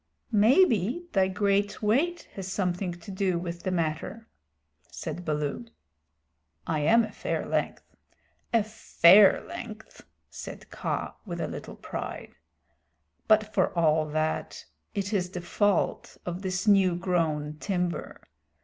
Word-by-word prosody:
"Maybe 235 - +4
thy 190 -3 +4
great 200 +2 0
weight 290 +12 +1
has 190 -1 -6
something 180 -1 -1
to 175 +3 -10
do 190 -2 0
with 170 0 -5
the - - -2
matter," 180 +6 -2 0.6
said 165 +2 -6
Baloo. 150 -6 -2 1.0
"I 155 - -1
am 230 +11 +5
a 220 - -5
fair - - -3
length - - -2 0.7
a 230 -2 +3
fair 205 -2 +6
length," 220 -2 -9 0.2
said - - -9
Kaa - - -3
with - - -6
a - - -1
little - - -7
pride. - - -6 0.9
"But 215 -1 +3
for 190 -2 +2
all 155 -2 +3
that, 155 +1 -2 0.3
it 200 +1 -2
is 180 -3 0
the 180 - -5
fault 205 +2 0
of 175 +1 -4
this 190 +1 -2
new 195 -4 +5
grown 160 -5 -1
timber. 180 -3 -3
190 Hz, 130 wpm, -27 LUFS, 170-210 Hz, 1.0 s, fair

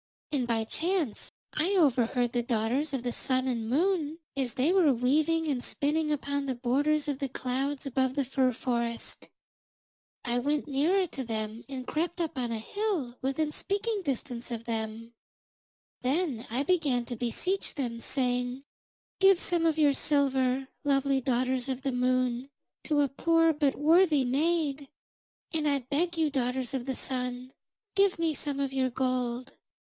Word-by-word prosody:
And 265 -5 0
by 225 -1 +1
chance 325 - -1 0.2
I 350 +6 +1
overheard 250 -6 +3
the 240 - +1
daughters 240 +5 0
of 260 -3 -2
the 245 -1 -2
Sun 260 0 0
and 230 -3 -2
Moon 320 +1 +1 0.2
as 260 -4 -1
they 275 +7 +2
were 355 -7 +5
weaving 305 +7 +2
and 260 -5 -1
spinning 300 +2 0
upon 285 -1 -1
the 265 -2 -2
borders 285 +5 +1
of 280 -2 -2
the 275 - -2
clouds 265 +3 -2
above 260 -1 0
the 280 - +1
fir 260 0 +2
forest. 235 -1 -3 0.9
I 240 0 0
went 290 +4 0
nearer 330 +8 +2
to 275 -6 -6
them, 220 -1 -4
and 260 -2 -5
crept 340 +5 -2
up 325 -4 -2
on 240 -2 -1
a 230 - -1
hill 320 - -2
within 285 +3 0
speaking 410 +5 -1
distance 250 -4 -3
of 230 -2 -4
them. 225 0 -4 0.9
Then 270 -2 -1
I 250 +5 0
began 285 -8 +1
to 240 - -5
beseech 305 - -1
them, 240 -6 -3
saying: 250 0 -1 0.6
"Give 390 -2 +6
some 345 -2 +2
of 320 -1 +1
your 295 -2 +5
silver, 270 -2 +1
lovely 275 -1 +2
daughters 255 +1 0
of 260 0 -2
the 270 - 0
Moon, 250 0 0 0.4
to 295 -2 +2
a 285 - +2
poor 330 +3 +3
but 290 -2 +1
worthy 315 -1 +4
maid; 290 +1 0 0.7
and 310 -2 0
I 280 -1 +2
beg 305 +7 -1
you, 315 -2 +2
daughters 255 -1 -1
of 255 -3 -2
the 265 - -1
Sun, 250 0 -3 0.4
give 395 -2 +4
me 330 -1 +1
some 285 -1 -3
of 275 -1 -1
your 260 -1 +1
gold." 250 0 -1
270 Hz, 160 wpm, -29 LUFS, 245-305 Hz, 0.9 s, Give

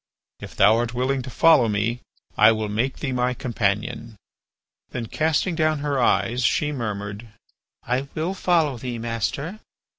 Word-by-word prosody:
If - - -10
thou 105 +3 +5
art 120 0 -2
willing 130 +2 0
to 130 - -8
follow 150 -2 +5
me, 105 +4 -1 0.4
I 110 +1 +7
will 110 -1 -3
make 115 +6 -1
thee 140 - -3
my 125 0 0
companion." 115 -2 -2 0.7
Then 120 -2 -4
casting 160 - 0
down 155 -1 +1
her 140 -3 0
eyes, 120 +1 +1
she 150 +3 +1
murmured: 105 -4 -5 0.6
"I 130 +3 -1
will 165 +4 -1
follow 165 -8 +1
thee, 125 -1 -4
master." 120 - -3
125 Hz, 150 wpm, -23 LUFS, 115-145 Hz, 0.7 s, I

